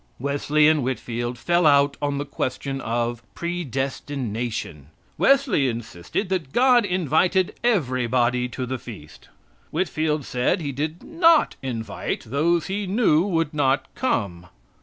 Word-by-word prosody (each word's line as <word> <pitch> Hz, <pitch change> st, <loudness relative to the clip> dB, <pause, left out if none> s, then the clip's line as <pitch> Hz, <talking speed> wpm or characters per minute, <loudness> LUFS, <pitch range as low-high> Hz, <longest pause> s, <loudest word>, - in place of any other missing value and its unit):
Wesley 145 Hz, +3 st, +2 dB
and 155 Hz, -1 st, +4 dB
Whitfield 120 Hz, -1 st, -3 dB
fell 175 Hz, +5 st, +2 dB
out 140 Hz, -1 st, +4 dB
on 145 Hz, -1 st, -1 dB
the 145 Hz, -, -3 dB
question 135 Hz, 0 st, -3 dB
of 120 Hz, 0 st, -2 dB
predestination. 130 Hz, -, -4 dB, 0.3 s
Wesley 270 Hz, -, +3 dB
insisted 115 Hz, -, -4 dB
that 180 Hz, -8 st, -2 dB
God 245 Hz, -, +4 dB
invited 180 Hz, 0 st, +1 dB
everybody 125 Hz, -, +1 dB
to 130 Hz, +1 st, -4 dB
the 130 Hz, 0 st, -4 dB
feast. 100 Hz, -12 st, -12 dB, 0.4 s
Whitfield 155 Hz, -3 st, -1 dB
said 125 Hz, +6 st, 0 dB
He 145 Hz, -4 st, -3 dB
did 155 Hz, +5 st, -4 dB
not 330 Hz, -1 st, +3 dB
invite 115 Hz, -4 st, -4 dB
those 155 Hz, +7 st, +1 dB
He 200 Hz, +1 st, -3 dB
knew 190 Hz, -6 st, +3 dB
would 165 Hz, -5 st, 0 dB
not 135 Hz, -2 st, 0 dB
come. 100 Hz, -, -2 dB
140 Hz, 125 wpm, -23 LUFS, 125-175 Hz, 0.4 s, and